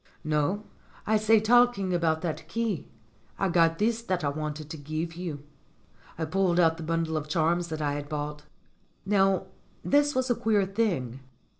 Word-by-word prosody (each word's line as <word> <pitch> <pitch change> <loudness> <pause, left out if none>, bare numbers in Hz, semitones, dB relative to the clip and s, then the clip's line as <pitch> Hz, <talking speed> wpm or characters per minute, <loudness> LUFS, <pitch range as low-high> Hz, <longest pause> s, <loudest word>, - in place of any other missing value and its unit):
"No. 155 +7 0 0.4
I 215 +1 +3
say 215 +1 +4
talking 225 -4 +3
about 160 -2 +1
that 160 -2 -4
key 225 -9 -2 0.5
I 195 - +1
got 165 -1 +3
this 225 +2 +1
that 185 -7 -2
I 145 - +1
wanted 150 +1 -4
to 160 - -5
give 155 +3 -4
you." 165 -5 -5 0.7
I 160 - -1
pulled 180 +1 +1
out 165 -2 +4
the - - -8
bundle 165 0 -1
of 155 -1 -3
charms 170 +2 +1
that 155 -2 -4
I 145 -1 0
had 145 0 -5
bought. 150 -1 -4 0.6
Now 195 -1 +2 0.4
this 290 0 +3
was 260 0 +1
a - - +3
queer 210 -3 +2
thing. 185 - -1
170 Hz, 170 wpm, -27 LUFS, 155-205 Hz, 0.7 s, say